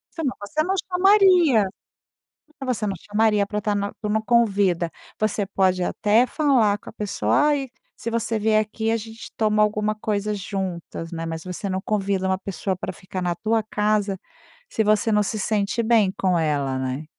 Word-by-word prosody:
Sim. 325 - -4
Mas, 260 - -2
você 310 - +1
não 380 +4 0
chamaria. 360 - +5 0.9
Mas, 255 -3 -1
você 210 - -2
não 195 - -2
chamaria 210 -1 +3
pra 210 0 -2
estar 210 0 -1
nu 200 0 -2
para 210 - -3
uma 220 +1 +1
convida. 200 -7 +2 0.3
Você 215 -1 0
pode, 185 -2 +1
até, 215 +6 +3
falar 250 -10 +2
com - - -12
a - - -12
pessoa: 210 -2 -2 0.2
"Ai, 280 -3 0 0.3
se 230 - -5
você 230 -1 -1
vier 215 0 +3
aqui, 220 +1 -2
a 230 - +2
gente 225 +1 -9
toma 215 -1 +2
alguma 210 0 0
coisa 210 -1 -2
juntas.", 185 -4 -5
né. 165 -1 -4
Mas, 165 0 -5
você 185 +2 -5
não 190 0 -2
convida 195 -2 -1
uma 190 0 +1
pessoa 190 0 -3
pra 185 - -5
ficar 185 0 -7
na 175 -1 -1
tua 220 +4 0
casa, 210 -2 0 0.5
se 220 - 0
você 215 +1 +2
não 210 0 +3
se 215 +2 -3
sente 210 +2 0
bem 220 -4 +3
com 185 -2 +2
ela, 145 -4 0
né. 130 +3 -3
210 Hz, 190 wpm, -23 LUFS, 190-225 Hz, 0.9 s, chamaria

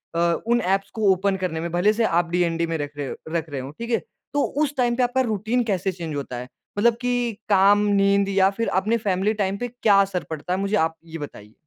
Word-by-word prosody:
अ, 170 0 +3
उन 240 +1 +3
एप्स 195 +2 0
को 215 -3 +3
ओपन 190 +1 +1
करने 160 -3 -1
में। 170 +1 -4
भले 180 +5 +3
से 230 +2 0
आप 170 -3 +1
डीएनडी 170 -1 +1
में 165 0 -2
रख 145 -1 -6
रहे 145 -2 -3
हो - - -5 0.2
रख 165 -1 -2
रहे 140 -2 -4
हों, 135 +2 -7
ठीक 230 +10 -7
है? 230 - +3 0.3
तो 290 - +2 0.2
उस 290 -1 -2
टाइम 240 -2 +2
पे 250 - +2
आपका 245 +2 +1
रूटीन 225 +1 0
कैसे 195 -4 -1
चेंज 165 -4 -6
होता 135 -3 -4
है? 125 +1 -6 0.3
मतलब 230 +3 +4
कि 245 -1 0 0.2
काम, 200 0 +5
नींद 200 0 +3
या 195 -1 +4
फिर 230 - 0
अपने 225 +4 +1
फैमिली 200 -1 0
टाइम 195 +1 -1
पे 245 - -3
क्या 230 -4 +2
असर 190 -3 -1
पड़ता 160 +3 -3
है 185 - -1
मुझे 200 +2 0
आप 160 -4 +1
ये 165 0 -7
बताइए? 110 -8 -9
195 Hz, 245 wpm, -23 LUFS, 165-220 Hz, 0.3 s, काम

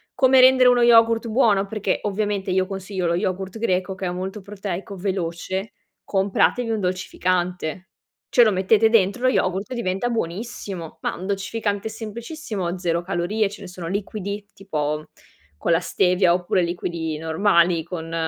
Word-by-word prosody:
Come 260 0 +5
rendere 255 -1 +7
uno 245 -1 +4
yogurt 230 -1 +5
buono? 215 -4 +3
Perché 215 0 -1
ovviamente 205 -2 -1
io 185 0 +1
consiglio 190 -2 -3
lo 170 - +1
yogurt 190 +2 -2
greco 190 -3 0
che 190 - -5
è 175 - -1
molto 190 +3 -5
proteico, 195 -1 -6
veloce, 190 +1 -3 0.3
compratevi 200 +4 +1
un 220 -1 0
dolcificante, 180 -1 -2 0.4
ce 240 - +6
lo 215 - +4
mettete 205 +4 +3
dentro 225 +2 +2
lo - - +5
yogurt 190 -1 0
e - - -3
diventa 195 0 -1
buonissimo. 195 -4 -5
Ma - - -2
un 185 - -7
dolcificante 205 +1 -2
semplicissimo, 220 - -5
0 170 -1 0
calorie, 195 +4 -1
ce 205 0 -11
ne 190 - -8
sono 180 -2 -7
liquidi 200 +1 -4
tipo 155 -5 -3 0.5
con 170 - -1
la 165 - +3
stevia 180 0 +3
oppure 180 +1 +1
liquidi 170 -2 -3
normali 170 +1 +2
con 165 -1 -6
195 Hz, 155 wpm, -23 LUFS, 180-215 Hz, 0.5 s, rendere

